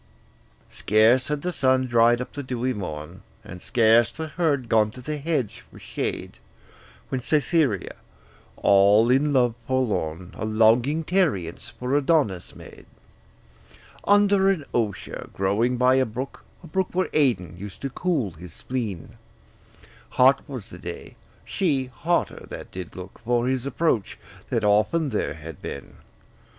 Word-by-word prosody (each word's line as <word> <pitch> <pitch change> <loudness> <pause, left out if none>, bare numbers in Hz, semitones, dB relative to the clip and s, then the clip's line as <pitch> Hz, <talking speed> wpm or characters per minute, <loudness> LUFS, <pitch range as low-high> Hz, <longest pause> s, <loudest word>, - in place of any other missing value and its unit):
Scarce 110 +5 +3
had 150 -1 -3
the 180 - -1
sun 130 -4 +2
dried 120 0 +4
up 125 - -7
the 145 - -4
dewy 130 -1 -2
morn, 90 -2 -7 0.2
And 90 -5 -10
scarce 115 -1 +4
the 160 -1 -6
herd 145 -6 0
gone 110 -1 +3
to 120 - -12
the 150 +4 -4
hedge 145 -6 -2
for - - -15
shade, - - -5 0.7
When 130 - -2
Cytherea, 145 - +1 0.6
all 100 +4 +5
in 145 +3 +3
love 125 -4 +3
forlorn, 95 -10 -1
A - - -7
longing 115 +8 +3
tarriance 120 - 0
for 125 +4 -3
Adonis 140 - +1
made - - -13 1.2
Under 200 -1 +4
an 175 -7 0
osier 105 -5 -3
growing 110 +6 +1
by 130 +1 +4
a 130 - +3
brook, 125 +5 -7 0.2
A - - -10
brook 190 +3 0
where 185 +1 -1
Adon 100 - +1
used 100 +4 -9
to 135 - -3
cool 150 - -1
his 80 +1 -12
spleen: 110 -4 -5 1.0
Hot 130 +2 +6
was 125 -6 -7
the 90 - -10
day; 85 0 -8 0.3
she 145 -9 0
hotter 170 +2 -1
that - - -8
did 90 -2 -8
look 95 +1 -10
For 120 +1 +1
his 130 0 -1
approach, 140 -7 0 0.3
that - - 0
often 105 +10 +2
there 105 - -2
had 80 -1 -10
been. 70 - -8
125 Hz, 145 wpm, -24 LUFS, 105-145 Hz, 1.2 s, Hot